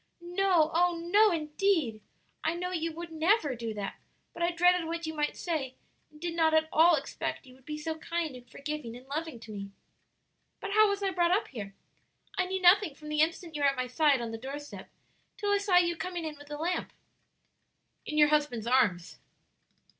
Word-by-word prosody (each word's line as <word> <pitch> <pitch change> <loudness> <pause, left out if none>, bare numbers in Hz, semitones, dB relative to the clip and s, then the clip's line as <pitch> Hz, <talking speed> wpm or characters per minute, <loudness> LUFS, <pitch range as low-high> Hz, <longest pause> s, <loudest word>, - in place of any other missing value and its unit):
"No, 350 -3 +2
oh, 350 +1 +3
no, 400 +6 +4
indeed! 310 - 0 0.4
I 325 - 0
know 360 +1 -3
you 330 -2 -2
would 335 +1 -8
never 320 - +2
do 230 -2 -4
that, 200 -1 -5 0.3
but - - -8
I 340 - +3
dreaded 355 0 +3
what 335 0 -3
you 315 - -4
might 295 -1 -1
say, 290 -7 -3 0.3
and 300 - -18
did 340 +1 -3
not 320 -1 +3
at 315 0 +3
all 335 +2 +6
expect 280 0 -4
you 255 - -15
would 260 0 -22
be 300 0 -4
so 320 +1 -4
kind 335 -4 -3
and 245 -1 -13
forgiving 285 -5 -6
and 250 - -15
loving 300 -1 -4
to 220 - -10
me. 200 -1 -6 0.9
"But 405 - -5
how 430 0 +5
was 400 0 -2
I 390 - +1
brought 345 -2 +2
up 385 +5 +1
here? 200 -6 -7 0.6
I 365 - 0
knew 380 +1 -2
nothing 360 -3 +5
from 300 0 -10
the 300 0 +1
instant 330 0 -1
you 295 - -3
were 285 - +5
at 275 - -2
my 255 -1 -1
side 275 +1 +2
on 230 -1 -4
the 225 - -6
door 270 +4 -5
step 290 0 -10 0.5
till 410 -1 -1
I 405 - +3
saw 395 -3 +3
you 345 -1 +3
coming 350 -1 -4
in 310 -1 -5
with 290 0 -14
the 295 0 -6
lamp." 345 +4 -2 1.1
"In 300 - -4
your 300 -1 +6
husband's 290 -7 +1
arms." 210 -9 +1
315 Hz, 210 wpm, -30 LUFS, 275-350 Hz, 1.1 s, all